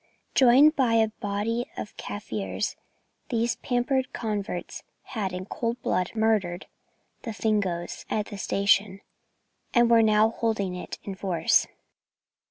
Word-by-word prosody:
Joined 270 +5 +6
by 250 -5 +2
a 220 -1 +4
body 215 +3 -2
of 210 - -6
Kaffirs, 100 - -4 0.5
these 235 0 0
pampered 255 +1 0
converts 205 -5 -4 0.2
had 210 -7 -3
in 180 +1 -5
cold 230 +4 -3
blood 180 0 0
murdered 210 -5 +1 0.6
the 230 - -5
Fingoes 200 -6 -1
at 210 -1 0
the 205 -2 -8
station, 200 0 +2 0.7
and 240 -1 +5
were 230 -1 +7
now 215 0 +4
holding 220 -5 -1
it 180 - -6
in 200 - -5
force. 190 -3 +2
215 Hz, 125 wpm, -26 LUFS, 190-230 Hz, 0.7 s, were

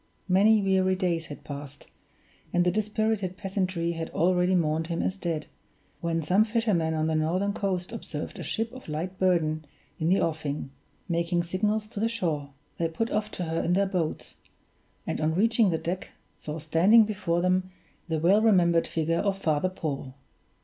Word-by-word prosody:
Many 205 +3 +5
weary 190 -1 +3
days 175 -4 -1
had 145 - -9
passed, 145 0 -8 0.7
and 175 0 +2
the 180 - +3
dispirited 215 -2 -1
peasantry 185 -3 -1
had 165 -1 -4
already 180 +1 +2
mourned 160 -1 +1
him 170 -1 -2
as 185 - -1
dead, 170 -5 -3 0.5
when 165 -2 -1
some 190 +7 +4
fishermen 210 -8 +1
on 155 0 0
the 160 - 0
northern 175 +6 +1
coast 185 -4 -2
observed 165 -9 -6
a - - -5
ship 225 +1 -2
of 255 -9 -10
light 175 +5 -4
burden 160 -4 +2 0.4
in 160 - +1
the 190 - +4
offing, 150 -4 -2 0.4
making 170 0 0
signals 210 +5 0
to 205 - -6
the 225 +2 +1
shore. 160 -11 -2 0.3
They 165 - +2
put 225 +8 -2
off 210 0 0
to 180 - -3
her 165 0 -1
in 175 - +1
their 200 +2 +3
boats; 180 -5 -3 0.7
and - - -2
on 155 +1 +1
reaching 225 +2 +3
the 165 - +1
deck 180 +3 -4 0.3
saw 150 +1 -6
standing 165 +9 +5
before 190 -5 -1
them 185 0 +1 0.4
the 160 -1 0
well 185 +7 +4
remembered 175 -6 +4
figure 165 +1 0
of 200 -1 0
Father 160 -1 +1
Paul. 140 -7 -5
180 Hz, 175 wpm, -27 LUFS, 160-195 Hz, 0.7 s, Many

